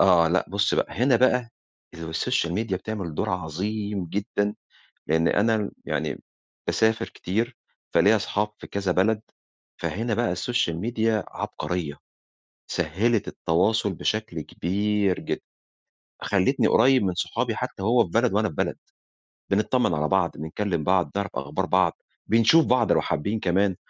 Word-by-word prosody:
آه، 85 -4 +5
لأ، 90 +3 +2
بُص، 100 +2 +1
بقى - - -1
هنا 125 +5 +3
بقى 125 -1 +2 0.4
السوشيال 80 +1 -1
ميديا 105 -1 -1
بتعمل 95 -4 -5
دور - - -1
عظيم 95 +3 -3
جدًا، 100 +3 -1 0.5
لإن 80 +1 +2
أنا 110 -1 +2
يعني - - -3 0.4
باسافر 110 0 +1
كتير، 115 +6 -2 0.4
فليّا 100 +6 +5
أصحاب 105 0 -1
فى - - -10
كذا 100 -2 -1
بلد. 105 +4 +2 0.6
فهنا 115 +3 -2
بقى 120 -4 +1
السوشيال 90 -3 -1
ميديا 110 -1 0
عبقرية. 80 -5 -4 0.7
سهلت 95 +7 0
التواصل 100 +5 +1
بشكل 110 -2 -2
كبير 100 +3 0
جدًا. - - -3 0.8
خلتني - - +2
قريب 130 -1 +5
من 90 -2 0
صحابي - - -1
حتى - - -4
وهو 115 +3 +4
في 90 - -10
بلد 115 +4 +2
وأنا 110 +1 +2
في 80 - -9
بلد. - - -1 0.7
بنتطمن 105 0 +2
على 75 0 0
بعض، 95 -2 +2
بنكلم 80 +2 -2
بعض، 90 0 +2
نعرف 100 0 -1
أخبار 75 +7 -2
بعض، 90 -3 +1 0.2
بنشوف 115 +9 +5
بعض 125 - +3
لو - - +4
حابين 100 +8 -2
كمان، 95 +1 +1
100 Hz, 140 wpm, -25 LUFS, 90-110 Hz, 0.8 s, آه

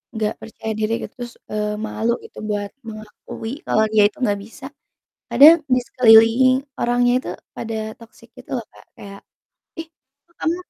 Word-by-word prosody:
nggak 215 -1 -1
percaya 220 0 -7
diri 215 +1 -1
gitu, - - -8
terus, 240 -1 -7 0.2
eee, 210 0 -2
malu 225 +2 -2
gitu, - - -15
buat 205 -1 -2 0.2
mengakui 215 +1 -9
kalau 220 - +2
dia 215 -1 +5
itu 205 - -13
nggak 205 -4 0
bisa, 245 +5 -13 0.6
kadang 310 +4 +8 0.2
di 250 - +3
sekeliling 235 +2 +5 0.2
orangnya 245 0 +2
itu - - -7 0.3
pada 225 -1 -5 0.2
toxic, 230 0 -17
gitu 255 - -15
loh, 235 - -6
Kak, - - -18
kayak, 200 0 -11 0.6
"Ih, 325 - -7 0.4
kok 340 - -33
kamu" 335 +1 0
225 Hz, 165 wpm, -20 LUFS, 215-245 Hz, 0.6 s, kadang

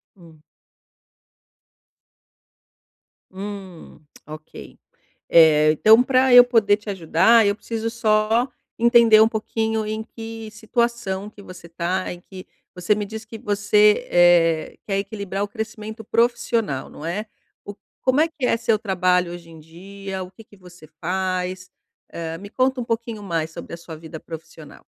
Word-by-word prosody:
Hum. 165 -4 -18 2.9
Hum, 195 -2 -9 0.3
ok. 155 +1 -12 0.5
Eh, 155 -2 +6
então 220 +9 +6
pra 260 -1 +3
eu 245 - +11
poder 225 -5 +2
te 210 0 -10
ajudar, 190 +5 +3
eu 200 0 +1
preciso 225 0 -4
só 220 +1 +1 0.3
entender 235 -2 +6
um 220 - +6
pouquinho 220 0 -2
em 215 +1 -4
que 225 -1 -9
situação 220 -2 -2
que 210 - -15
você 180 -3 -12
tá, 170 +2 -2
em 175 - -8
que 185 0 -12 0.3
você 180 +3 0
me 210 0 -3
diz 220 +2 -8
que 225 +1 -9
você, 210 0 +2
eh, 170 -2 +3
quer 195 -2 -1
equilibrar 200 -1 -4
o - - -3
crescimento 220 +1 -7
profissional, 230 - 0
não 150 - -10
é? 200 +6 -4 0.4
O 205 - -9 0.3
como 260 +3 +2
é 320 - +3
que 310 -5 -5
é 230 - +2
seu 225 -2 0
trabalho 180 -4 +1
hoje 170 -1 -11
em 160 - -13
dia? 190 +4 -8
O 180 - -12
que 225 - -15
que 205 -1 -21
você 180 -3 -16
faz? 185 +1 -3 0.4
Eh, 165 -1 -5
me 200 +1 -10
conta 255 +2 0
um - - -5
pouquinho 230 -1 -4
mais 165 -5 -3
sobre - - -10
a - - -5
sua 165 -1 -10
vida 160 0 -10
profissional. 160 0 -12
205 Hz, 150 wpm, -22 LUFS, 175-225 Hz, 2.9 s, eu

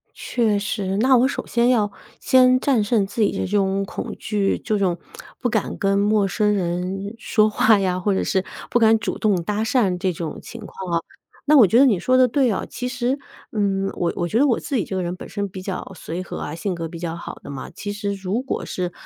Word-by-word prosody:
确 220 -4 0
实， 200 -2 -2
那 260 +4 +5
我 250 +2 +4
首 - - -4
先 235 0 +2
要 220 -5 +3 0.3
先 255 0 +5
战 255 -4 +2
胜 205 -1 +1
自 200 +4 -5
己 205 - +4
的 - - -4
这 - - -1
种 195 0 +1
恐 - - -6
惧， 205 -2 0
这 215 - -1
种 180 -3 0 0.4
不 250 - 0
敢 220 -3 -1
跟 195 0 +2
陌 205 0 +3
生 210 +2 +1
人 185 +2 -2
说 215 -1 +2
话 215 0 +4
呀， 185 -2 0
或 200 +2 +1
者 - - 0
是 190 -1 0 0.3
不 - - +3
敢 225 -1 +5
主 215 - -3
动 200 -6 +1
搭 210 +4 -1
讪 220 -5 +2
这 185 0 0
种 165 -2 -5
情 235 - -9
况 190 -3 -7
啊。 170 - +2 0.5
那 305 - +8
我 240 -7 +8
觉 225 +6 +3
得 275 - +7
你 215 -8 +3
说 255 +8 +2
得 255 -1 +6
对 260 0 +2
啊， 200 - -2
其 250 - -5
实， 250 +2 -1 0.3
嗯， 195 -2 0
我 175 -1 0
我 175 - -1
觉 220 - +1
得 285 - +5
我 245 - +2
自 280 - -3
己 210 - +1
这 190 - -6
个 185 - -1
人 175 +1 -3
本 - - -9
身 200 0 -3
比 185 0 -8
较 185 -1 -5
随 175 0 -5
和 185 - -7
啊， 150 - -5
性 185 +3 -3
格 165 -1 -4
比 170 - -8
较 165 -1 -4
好 170 - -7
的 - - -10
嘛。 140 -2 -7
其 205 - -6
实 205 0 -3
如 195 +4 -2
果 265 - -4
是 180 -1 -3
205 Hz, 260 characters per minute, -22 LUFS, 185-230 Hz, 0.5 s, 那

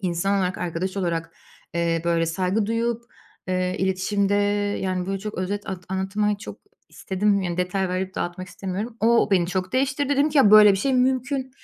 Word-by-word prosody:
insan 190 +2 0
olarak, 185 0 -1
arkadaş 180 +3 -3
olarak, 170 -3 -2 0.4
eee, 165 -1 0
böyle, 170 -1 +1
saygı 185 +5 0
duyup, 230 +1 -1 0.5
eee, 185 0 -1
iletişimde, 195 +2 0 0.5
yani, 185 -1 -2
böyle, 195 0 -2
çok 210 +2 -6
özet 200 +2 -3
at 180 -1 -6
anlatmayı 200 +2 -1
çok - - -9 0.3
istedim. 200 +1 0
Yani, 175 -1 -3
detay 180 +1 -1
verip 185 +1 -3
dağıtmak 185 +1 -4
istemiyorum. 200 +5 -5
O 230 -1 +3
beni 180 -3 +3
çok 185 +2 -3
değiştirdi. 270 +2 0
Dedim 285 +2 +2
ki, 290 - +2
"Ya, 215 -7 +6
böyle 210 -1 +9
bir - - +1
şey 270 +4 0
mümkün." 260 +1 0
190 Hz, 175 wpm, -23 LUFS, 180-215 Hz, 0.5 s, böyle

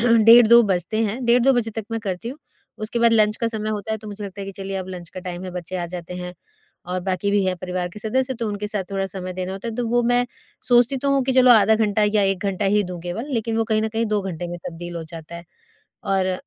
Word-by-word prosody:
डेढ़ 230 0 +7
2 235 +1 +8
बजते 195 +2 -1
हैं। 230 +4 -3
डेढ़ 240 +1 +4
2 270 +2 +5
बजे 235 -2 0
तक 220 -1 -5
मैं 225 - -2
करती 200 +1 -4
हूँ। 275 - -7 0.4
उसके 215 +2 -3
बाद 235 0 +4
लंच 215 -1 +3
का 230 - -1
समय 215 -1 -4
होता 215 0 -3
है, 220 - -2
तो 215 0 -10
मुझे 205 0 -7
लगता 200 0 -8
है 195 - -5
कि 195 - -6
चलिए 195 0 -5
अब 190 -1 -5
लंच 180 -3 -8
का 185 - -7
टाइम 180 0 -6
है, 185 - -5
बच्चे 180 0 -5
आ 175 -1 -3
जाते 175 0 -7
हैं 180 0 -6 0.6
और 185 0 -2
बाकी 190 +1 -1
भी 205 -1 +2
हैं 185 -1 0
परिवार 180 0 -3
के 175 - -11
सदस्य, 260 +4 0
तो 230 -1 -3
उनके 205 0 -3
साथ 205 -2 -3
थोड़ा 195 0 -1
समय 185 -1 -6
देना 185 0 -4
होता 195 +4 -5
है। 225 - -5
तो 240 0 -2
वो 240 +1 +2
मैं 245 +1 +2 0.4
सोचती 245 +2 +4
तो 280 +2 0
हूँ 275 -1 +3
कि 265 - +1
चलो 255 -1 +6
आधा 220 -2 +6
घंटा 215 -1 +1
या 210 0 +2
1 195 -1 0
घंटा 195 +1 -1
ही 205 +2 +3
दूँ 175 - -6
केवल, 180 +9 -4
लेकिन 225 0 -1
वो 225 - +2
कहीं 215 0 +1
न 220 - 0
कहीं 225 +1 -1
2 210 - +2
घंटे 175 -2 -4
में 175 0 -6
तब्दील 175 +1 -7
हो 165 - -4
जाता 165 0 -10
है। 170 - -10 0.7
और 190 -1 +1
205 Hz, 280 wpm, -22 LUFS, 185-230 Hz, 0.7 s, 2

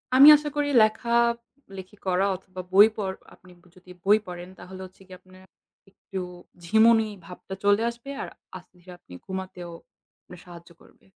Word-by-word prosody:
আমি 275 +3 +9
আশা 295 0 -5
করি 290 0 -1
লেখা 220 +2 -1 0.7
লেখি 190 +2 -11
করা 185 +1 +1
অথবা 185 0 -10
বই 205 +3 +8
পড় 195 -3 -3 0.2
আপনি 185 - -19 0.2
যদি 185 0 -17
বই 205 +2 +5
পড়েন 180 0 -8
তাহলে 185 +1 -11
হচ্ছে 185 +1 -18
গিয়ে 185 -1 -13
আপনার 185 0 -19 0.5
একটু 195 0 -9 0.4
ঝিমুনি 220 +4 +4 0.2
ভাবটা 180 +2 -10
চলে 205 +1 +3
আসবে। 235 +3 -11
আর - - -5 0.3
আস্তে - - -18
ধীরে 180 +1 -15
আপনি 90 - -17
ঘুমাতেও 185 -2 -7 0.5
আপনার 180 - -14
সাহায্য 170 -1 -13
করবে। - - -23
190 Hz, 160 wpm, -25 LUFS, 180-215 Hz, 0.7 s, আমি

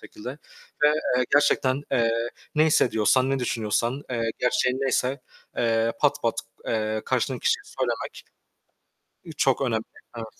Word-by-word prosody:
şekilde 115 +4 -8 0.5
ve, 150 - +7 0.3
eee, 125 - +2
gerçekten, 140 -2 +3
eee, 115 -2 +3 0.4
ne 155 0 +5
hissediyorsan, 130 -3 +3
ne 135 - +1
düşünüyorsan, 120 +2 -1
eee, 115 -2 -1
gerçeğin 125 0 +1
neyse, 135 0 0 0.4
eee, 115 -1 +2
pat 145 - +2
pat, 115 - +1 0.3
eee, 110 -1 -1
karşındaki - - -1
kişiye - - +2
söylemek - - -4 1.1
ı - - -8
çok 135 -1 +2
önemli. 115 -4 0 0.3
Evet. 115 - -4
125 Hz, 135 wpm, -25 LUFS, 115-135 Hz, 1.1 s, ve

